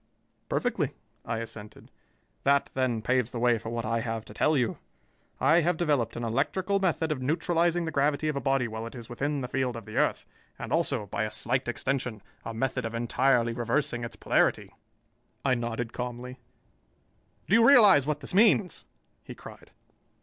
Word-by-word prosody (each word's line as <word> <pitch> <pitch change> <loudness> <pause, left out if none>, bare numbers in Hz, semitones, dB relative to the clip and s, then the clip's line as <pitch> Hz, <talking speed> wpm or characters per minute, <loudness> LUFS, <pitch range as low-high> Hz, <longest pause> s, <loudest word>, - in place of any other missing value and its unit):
"Perfectly," - - -1 0.3
I 115 - -2
assented. 110 -2 -9 0.5
"That, 140 0 +2
then, 125 -4 -1
paves 125 +1 +1
the 125 - -6
way 120 -1 +2
for 115 - -7
what 115 -1 -3
I 115 +1 0
have 115 -1 -4
to - - -12
tell 155 -1 +2
you. 120 -4 -1 0.6
I 160 +5 +5
have 170 +1 +1
developed 145 -8 0
an 120 - -4
electrical 170 - 0
method 165 -4 0
of 140 -4 -2
neutralizing 170 +4 +1
the 160 - -3
gravity 145 +1 +1
of 150 - -1
a 140 - -2
body 135 -1 +1
while 110 0 -5
it 115 - -10
is 120 -2 -9
within 140 +4 -2
the 125 - -3
field 125 -1 -1
of 115 -3 -8
the 110 - -7
earth, - - +1 0.3
and - - -5
also, 140 -9 0
by 100 - -2
a - - -3
slight 130 +4 -1
extension, 120 -2 -2 0.2
a - - -5
method 115 +3 -2
of 115 0 -4
entirely 120 0 +2
reversing 120 +2 -1
its 115 - -6
polarity." - - +1 0.7
I 130 - +3
nodded 120 -1 -3
calmly. 125 +1 -6 1.1
"Do 195 - +4
you 230 - +6
realize 205 - +7
what 150 -1 -1
this 135 - -5
means?" 200 -4 +3 0.4
he - - -9
cried. - - -13
130 Hz, 180 wpm, -28 LUFS, 115-150 Hz, 1.1 s, realize